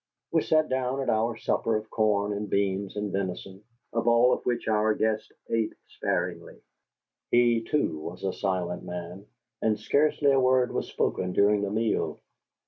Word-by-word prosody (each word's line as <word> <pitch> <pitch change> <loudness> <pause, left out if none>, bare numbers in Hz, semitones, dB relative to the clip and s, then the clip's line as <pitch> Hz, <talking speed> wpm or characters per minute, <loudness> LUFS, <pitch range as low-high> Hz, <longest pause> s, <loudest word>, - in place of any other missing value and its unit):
We - - +3
sat 155 -1 +2
down 130 +1 -1
to - - +1
our 115 +1 0
supper 115 0 0
of 110 0 -8
corn 105 -2 +1
and 105 0 -4
beans 100 0 0
and 105 -1 -2
venison, 95 +1 -4 0.3
of 115 0 -1
all 120 +1 +5
of - - -3
which 120 -1 -1
our 110 0 +2
guest 110 0 -1 0.2
ate 115 -1 0 0.2
sparingly. - - -3 0.7
He, 120 -1 +4
too, 115 - -1
was 85 +5 -8
a 95 -1 -1
silent 90 -3 -2
man, 90 +3 -7 0.3
and 110 -1 +1
scarcely 145 -1 +2
a 135 - +4
word 130 -1 +3
was - - -2
spoken 90 -1 -1
during 100 +1 +3
the 100 - -1
meal. 110 +2 -1
110 Hz, 165 wpm, -27 LUFS, 100-120 Hz, 0.7 s, all